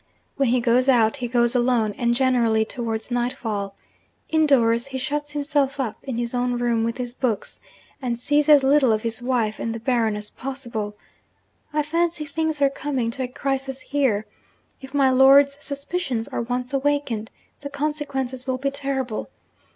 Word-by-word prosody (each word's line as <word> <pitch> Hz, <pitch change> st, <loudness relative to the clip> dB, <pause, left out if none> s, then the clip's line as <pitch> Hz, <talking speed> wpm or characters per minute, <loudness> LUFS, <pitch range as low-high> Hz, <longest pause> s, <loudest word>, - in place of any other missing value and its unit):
When 275 Hz, -3 st, +1 dB
he 250 Hz, +1 st, +3 dB
goes 250 Hz, +3 st, +3 dB
out, 230 Hz, -1 st, +4 dB
he 250 Hz, -3 st, -3 dB
goes 240 Hz, 0 st, +2 dB
alone, 240 Hz, -4 st, +2 dB
and 235 Hz, 0 st, +1 dB
generally 240 Hz, -4 st, +2 dB
towards 225 Hz, 0 st, -4 dB
nightfall. 225 Hz, -5 st, -2 dB, 0.5 s
Indoors, 265 Hz, -7 st, +3 dB
he 265 Hz, -1 st, -5 dB
shuts 295 Hz, +3 st, -3 dB
himself 285 Hz, -1 st, 0 dB
up 235 Hz, -5 st, -3 dB
in 260 Hz, -4 st, -4 dB
his 235 Hz, 0 st, -2 dB
own 245 Hz, 0 st, 0 dB
room 235 Hz, -2 st, +1 dB
with 230 Hz, +1 st, -2 dB
his 245 Hz, -1 st, -4 dB
books, 245 Hz, -5 st, -2 dB, 0.4 s
and 240 Hz, -2 st, -2 dB
sees 290 Hz, +3 st, +2 dB
as 290 Hz, -2 st, +7 dB
little 270 Hz, -2 st, +4 dB
of 215 Hz, 0 st, 0 dB
his 230 Hz, +1 st, -3 dB
wife 240 Hz, -4 st, 0 dB
and 230 Hz, 0 st, -3 dB
the -, -, -5 dB
Baron 230 Hz, -3 st, +1 dB
as 210 Hz, 0 st, -6 dB
possible. 240 Hz, -6 st, -5 dB, 0.8 s
I 300 Hz, 0 st, +1 dB
fancy 330 Hz, 0 st, 0 dB
things 310 Hz, 0 st, -1 dB
are 275 Hz, -, +5 dB
coming 265 Hz, -4 st, -2 dB
to 260 Hz, -, -5 dB
a 255 Hz, -, -1 dB
crisis 270 Hz, +1 st, -2 dB
here. 260 Hz, -7 st, 0 dB, 0.6 s
If 270 Hz, +1 st, -10 dB
my 270 Hz, -2 st, +4 dB
lord's 275 Hz, +2 st, +6 dB
suspicions 280 Hz, -4 st, -3 dB
are -, -, -2 dB
once 245 Hz, +2 st, -3 dB
awakened, 275 Hz, -6 st, 0 dB, 0.3 s
the 285 Hz, -, -5 dB
consequences 280 Hz, -3 st, -3 dB
will 260 Hz, -1 st, 0 dB
be 275 Hz, +1 st, -1 dB
terrible. 270 Hz, -4 st, -3 dB
255 Hz, 170 wpm, -23 LUFS, 235-280 Hz, 0.8 s, as